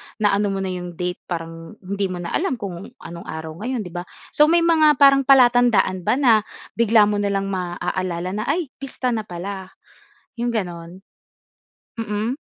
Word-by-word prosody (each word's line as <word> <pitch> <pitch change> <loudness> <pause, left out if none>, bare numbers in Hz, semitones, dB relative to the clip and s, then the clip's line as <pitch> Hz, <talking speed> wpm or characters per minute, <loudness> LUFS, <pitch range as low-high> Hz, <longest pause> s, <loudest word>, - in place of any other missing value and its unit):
naano 205 -1 +2
mo 195 -1 -2
na 190 - -2
'yong 180 -1 -6
date 180 +1 -3
parang 165 +1 -6
hindi 200 +1 -2
mo 180 -1 -5
na 170 - -5
alam 330 -8 0
kung 195 -2 -7 0.2
anong 170 0 -9
araw 160 0 -6
ngayon, 240 +1 -3
'di 180 - -9
ba. 175 +1 -6 0.2
So, 300 - +5
may 335 +1 +4
mga 315 -3 +5
parang 275 -1 +5
palatandaan 240 -8 +4
ba - - +4
na 260 -4 +4 0.5
bigla 225 -1 +5
mo 205 0 +1
na 205 - 0
lang 195 0 -1
maaalala 180 -1 -3
na, 210 +2 -3
ay, 295 0 -1
pista 260 -2 -3
na 220 -2 -3
pala, 190 +2 -6 0.7
'yong 240 0 -1
gano'n? 175 -4 -5 1.0
Mm. 220 +2 -2
200 Hz, 175 wpm, -21 LUFS, 180-245 Hz, 1.0 s, So